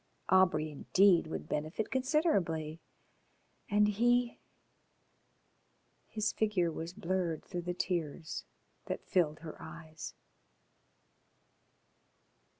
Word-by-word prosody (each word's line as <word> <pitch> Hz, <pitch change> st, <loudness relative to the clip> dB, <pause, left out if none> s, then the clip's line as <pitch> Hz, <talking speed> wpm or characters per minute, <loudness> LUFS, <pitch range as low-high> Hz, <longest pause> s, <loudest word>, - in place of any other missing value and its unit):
Aubrey, 170 Hz, -5 st, +4 dB
indeed, 180 Hz, +4 st, +4 dB
would 160 Hz, -, -5 dB
benefit 155 Hz, +8 st, -2 dB
considerably. 195 Hz, -, +1 dB, 0.9 s
And 210 Hz, 0 st, +4 dB
he? 240 Hz, +3 st, +2 dB, 1.7 s
His 215 Hz, -1 st, -1 dB
figure 200 Hz, -6 st, +1 dB
was 165 Hz, +1 st, -5 dB
blurred 180 Hz, -4 st, -2 dB
through 175 Hz, -2 st, -4 dB
the 175 Hz, +1 st, -3 dB
tears 165 Hz, -3 st, -2 dB, 0.4 s
that -, -, -4 dB
filled 155 Hz, -4 st, +1 dB
her 160 Hz, -2 st, -8 dB
eyes. 160 Hz, -1 st, -8 dB
175 Hz, 85 wpm, -33 LUFS, 160-210 Hz, 1.7 s, Aubrey